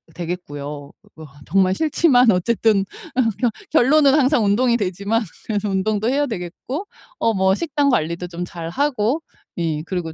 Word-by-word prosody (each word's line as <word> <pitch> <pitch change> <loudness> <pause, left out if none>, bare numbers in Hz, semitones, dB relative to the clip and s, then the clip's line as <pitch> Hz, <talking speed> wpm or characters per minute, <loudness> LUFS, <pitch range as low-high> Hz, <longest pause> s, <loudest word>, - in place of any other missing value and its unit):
되겠고요. 170 -4 -5
어 145 -1 -8 0.2
그 160 - -11
아 145 -1 -15
정말 190 +2 +3
싫지만 270 - +3
어쨌든 200 +1 +2 0.9
결론은 280 +2 +5
항상 265 -6 +3
운동이 235 +4 +3
되지만 200 +3 -1 0.3
그래서 210 -1 -1
운동도 210 +3 0
해야 285 +2 +1
되겠고 225 - -5 0.3
어 225 -1 +2
뭐 190 -1 +3
식단 290 -2 0
관리도 170 -5 -1
좀 175 +1 -5
잘 165 -2 -7
하고 270 - 0 0.4
예 160 -3 -1
그리고 175 -3 -4
200 Hz, 310 characters per minute, -21 LUFS, 175-250 Hz, 0.9 s, 결론은